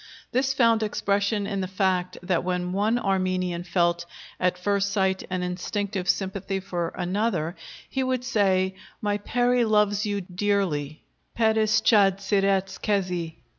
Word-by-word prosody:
This 265 +2 +1
found 230 -4 +3
expression 205 0 0
in 200 -1 -2
the 185 - -2
fact 185 -1 0
that 180 -1 0
when 180 0 -1
one 210 +4 +2
Armenian 185 -4 0
felt 170 -1 0 0.3
at 180 0 +1
first 200 +1 0
sight 190 -1 +1
an 185 -1 -2
instinctive 190 +1 -3
sympathy 195 0 -1
for 175 -3 -3
another, 180 -3 -1 0.3
he 265 - -2
would 255 -1 0
say, 190 -6 +2 0.3
"My 205 -1 -1
peri 245 +3 +2
loves 210 -2 +2
you 205 -1 -1
dearly 180 -6 -1 0.3
(peris 220 -1 +3
chad 195 -4 +4
siretz 195 -1 +1
kezi)." 180 -5 -1
195 Hz, 135 wpm, -25 LUFS, 180-210 Hz, 0.3 s, chad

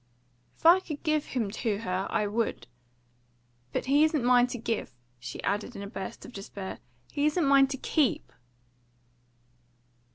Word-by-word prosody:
"If - - -24
I 345 +3 +8
could 305 -6 -7
give 310 -2 +1
him 225 -6 -2
to 215 -1 -1
her, 185 -2 -2
I 210 - +1
would. 210 - -1 1.1
But - - -2
he 285 +3 +4
isn't 310 -4 +2
mine 245 0 +5
to 250 - -5
give." 225 - -3 0.2
She 120 0 -7
added 205 +4 -2
in 200 - -6
a - - -5
burst 195 -1 -7
of 245 - -11
despair, 195 -1 -7 0.3
"He 290 +1 +1
isn't 305 +1 +1
mine 275 -1 +6
to 270 0 -4
keep!" 275 -3 0
245 Hz, 160 wpm, -28 LUFS, 200-290 Hz, 1.1 s, I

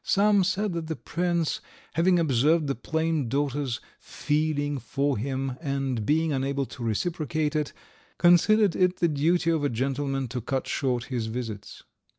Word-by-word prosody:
Some 205 0 +4
said 190 +2 0
that 165 -1 -4
the 160 - -2
prince, 170 -1 -1 0.3
having 175 +2 +3
observed 155 +1 +3
the 140 - 0
plain 160 +1 -1
daughter's 140 -2 -1 0.2
feeling 145 -1 -1
for 140 +3 -1
him 130 +2 -3
and 135 -7 -2
being 160 +1 +2
unable 135 +1 -1
to 125 -1 -9
reciprocate 155 - -1
it, 150 -2 0 0.5
considered 190 +3 +5
it 180 0 +2
the 170 - +2
duty 165 +3 +2
of 160 -3 0
a 145 - +2
gentleman 135 +2 -1
to 125 +1 -4
cut 130 +3 -2
short 125 -3 0
his 115 -3 -1
visits. 110 -3 -6
145 Hz, 155 wpm, -26 LUFS, 135-165 Hz, 0.5 s, considered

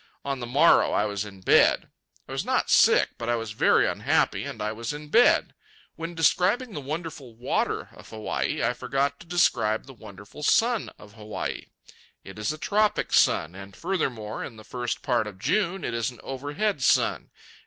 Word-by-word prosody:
On 140 -1 -2
the 120 - -5
morrow 140 +7 +4
I 105 - +2
was 100 0 -3
in 100 -2 -12
bed. - - +4 0.4
I - - -10
was - - -2
not - - 0
sick, - - +5
but 115 0 -4
I 120 - +2
was 115 -2 -4
very 105 - +3
unhappy, - - 0
and - - -7
I 105 0 -2
was 115 +5 -5
in 150 0 -9
bed. 235 +9 +4 0.4
When 165 +1 -6
describing 185 - +2
the 150 - -5
wonderful 150 -4 -6
water 120 +2 -2
of - - -15
Hawaii 110 -1 -2
I - - +1
forgot 135 +3 -2
to 170 - -14
describe 120 -11 +1
the 135 - -12
wonderful 100 +2 -12
sun 230 +8 +2
of 105 -1 -15
Hawaii. 105 -1 -5 0.6
It 95 +2 -11
is 105 - -1
a 155 - -6
tropic 210 +5 0
sun, 80 - +3
and, 100 +1 -11
furthermore, 125 - -3
in - - -8
the 110 - -13
first 120 +1 -4
part 120 -3 +1
of 100 -3 -9
June, 175 - 0
it 120 - -3
is 115 -2 -1
an 125 - -13
overhead 145 +7 -2
sun. - - +2
125 Hz, 185 wpm, -26 LUFS, 110-165 Hz, 0.6 s, sick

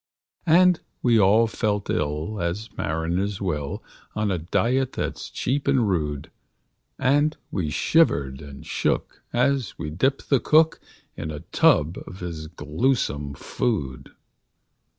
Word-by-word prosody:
And 180 +1 +6 0.2
we 120 -3 +4
all 105 +4 +5
felt 105 -3 -1
ill 75 +7 -2
as 90 +6 -3
mariners 85 +6 -1
will, 75 -7 -3 0.3
On 105 -1 0
a 90 - 0
diet 125 +10 0
that's - - -4
cheap 140 +3 -2
and 130 -5 +3
rude; 75 -7 -2 0.7
And 145 +4 +2
we 85 -6 -1
shivered 70 - +2
and 70 -2 -10
shook - - -1
as 130 -2 +1
we 75 -2 -5
dipped 135 - -1
the 135 - +5
cook 155 +6 +4 0.4
In 80 - -5
a 75 -1 -6
tub 80 +4 +2
of 90 +1 -10
his 80 -3 -5
gluesome 75 - -1
food. 70 - -2
95 Hz, 130 wpm, -24 LUFS, 75-130 Hz, 0.7 s, And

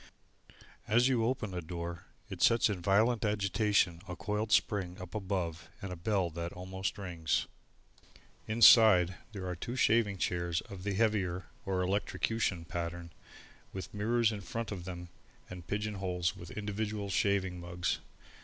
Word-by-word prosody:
As 120 +3 +4
you 125 -4 +2
open 115 -4 -1
the 90 -1 -3
door, 85 +1 -6 0.2
it - - -7
sets 115 -2 +5
in 95 -4 -4
violent 110 +5 +3
agitation 100 -4 +1
a 90 - -5
coiled 105 +4 -2
spring 95 -4 +1
up 90 -1 -9
above 95 -4 -3
and 95 -4 -5
a - - -5
bell 90 0 0
that 85 +1 -4
almost 95 +3 -4
rings. 85 -5 -1 1.0
Inside, 110 -5 +7 0.2
there 100 -4 -6
are 90 -1 -3
two 120 +8 -5
shaving 110 -5 +3
chairs 85 -2 -1
of 95 -2 -10
the 100 +1 -2
heavier, 95 -4 +1 0.2
or 95 -1 +1
electrocution 100 -1 -1
pattern, 85 0 -5 0.6
with 95 - -6
mirrors 115 +2 +2
in 105 -2 -5
front 115 +5 -4
of 90 -4 -5
them 90 -1 -7 0.4
and 90 -2 -9
pigeon 105 +2 -2
holes 90 -2 -1
with 85 -3 -10
individual 105 -1 -3
shaving 95 -2 +1
mugs. 90 +1 -2
95 Hz, 150 wpm, -32 LUFS, 90-105 Hz, 1.0 s, Inside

